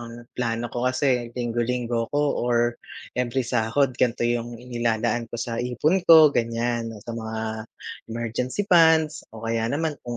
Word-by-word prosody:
ang 120 0 -9
plano 120 -1 -2
ko 125 +1 0
kasi 125 -2 +1
linggo-linggo 120 -1 -1
ko 145 - +1 0.2
or 120 0 +1 0.3
every 125 +1 -1
sahod 120 +3 +1
gan'to 120 -1 +1
'yong 120 0 -1
inilalaan 120 -1 -1
ko 120 - -6
sa 115 0 -3
ipon 135 +9 +1
ko, 160 -3 +9
gan'yan. 115 0 -1
Oh, 105 - -13
sa 115 - -6
mga 110 -1 -5 0.7
emergency 120 - -3
funds, 160 -4 +4
o 110 0 -11
kaya 115 0 0
naman 150 +1 -2
kung 120 -1 -6
120 Hz, 155 wpm, -24 LUFS, 115-125 Hz, 0.7 s, ko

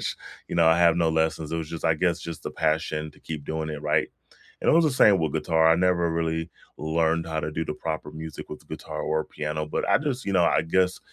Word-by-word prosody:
which, - - -3 0.3
you - - -4
know, 85 -1 +4
I 80 +1 +5
have 85 -1 +5
no 85 -2 +2
lessons, 80 -1 0
it - - 0
was 80 - -5
just, 85 - -7
I 80 - +4
guess, 85 +1 +1
just 85 -1 -7
the - - -4
passion 80 -1 -1
to - - -22
keep 75 -3 -6
doing 80 0 -3
it 75 -1 -5
right. 75 0 +1 0.5
And - - +4
it - - +4
was 165 +1 +5
the 150 - +2
same 105 -6 +5
with 80 -3 -1
guitar, 80 0 +3
I 80 - +6
never 90 -2 +2
really 80 0 -1 0.3
learned 80 +1 0
how 80 -1 -2
to - - -3
do 80 +2 -2
the 75 - -4
proper 80 -1 -4
music 80 0 -8
with 75 - -8
the - - -22
guitar - - -6
or 80 0 0
piano, 75 0 -4
but 75 - -2
I - - +5
just, 140 -3 -3
you 100 - -2
know, 90 -3 +4
I - - +3
guess 90 +3 +1
80 Hz, 265 wpm, -25 LUFS, 80-85 Hz, 0.5 s, I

